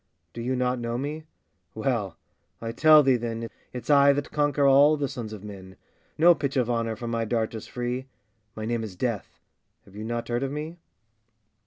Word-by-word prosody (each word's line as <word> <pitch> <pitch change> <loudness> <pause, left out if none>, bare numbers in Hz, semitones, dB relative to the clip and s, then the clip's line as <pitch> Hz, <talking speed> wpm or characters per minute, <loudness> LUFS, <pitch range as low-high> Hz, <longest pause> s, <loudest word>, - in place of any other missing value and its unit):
Do 115 - -6
you 130 +2 -1
not 125 0 0
know 120 0 -3
me? 150 +4 -4 0.5
well! - - -1 0.4
I 115 0 -4
tell 155 +5 +6
thee, 130 -2 +4
then, 115 -1 -4 0.2
It's 125 - -7
I 140 0 +7
that 145 0 -3
conquer 145 -1 +1
all 140 +3 +6
the 140 -1 -1
sons 120 -5 -6
of 105 -2 -8
men! 95 -2 -10 0.4
No 175 +3 +7
pitch 140 -3 -3
of 125 -2 +1
honour 115 -1 -1
from 120 +1 -5
my 115 -1 0
dart 115 0 -1
is 110 - -7
free; 125 +2 -4 0.5
My 110 - -5
name 115 0 -1
is 105 -4 -7
Death! 115 0 -3 0.5
have 100 - -18
you 105 - -6
not 120 +1 -3
heard 120 +1 -1
of 135 0 -2
me? 155 +4 -6
120 Hz, 195 wpm, -26 LUFS, 115-140 Hz, 0.5 s, I